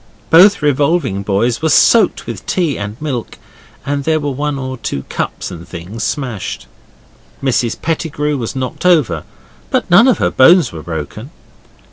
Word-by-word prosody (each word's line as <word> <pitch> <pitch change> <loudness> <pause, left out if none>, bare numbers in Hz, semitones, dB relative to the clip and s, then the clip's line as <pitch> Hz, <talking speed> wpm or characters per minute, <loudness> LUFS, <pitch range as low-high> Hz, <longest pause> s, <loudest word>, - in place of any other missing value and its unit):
Both 185 +1 +6
revolving 145 - +1
boys 105 +6 0
were 160 - +1
soaked 215 +6 +4
with - - -7
tea 170 -7 0
and 105 +2 -6
milk, 135 -6 -4 0.5
and 140 0 -2
there 155 +2 +1
were 145 -1 -2
one 145 +1 -2
or 130 -1 -5
two 70 - -4
cups - - -4
and 85 -1 -9
things 95 +6 -7
smashed. 120 - -4 0.8
Mrs 125 -3 0
Pettigrew 150 -2 -2
was 120 -3 -4
knocked 130 -1 -4
over, 125 - +2 0.4
but - - -1
none 210 +9 +7
of 255 - +3
her - - 0
bones 170 +6 +5
were 80 - -8
broken. 80 -2 -6
135 Hz, 155 wpm, -16 LUFS, 105-160 Hz, 0.8 s, none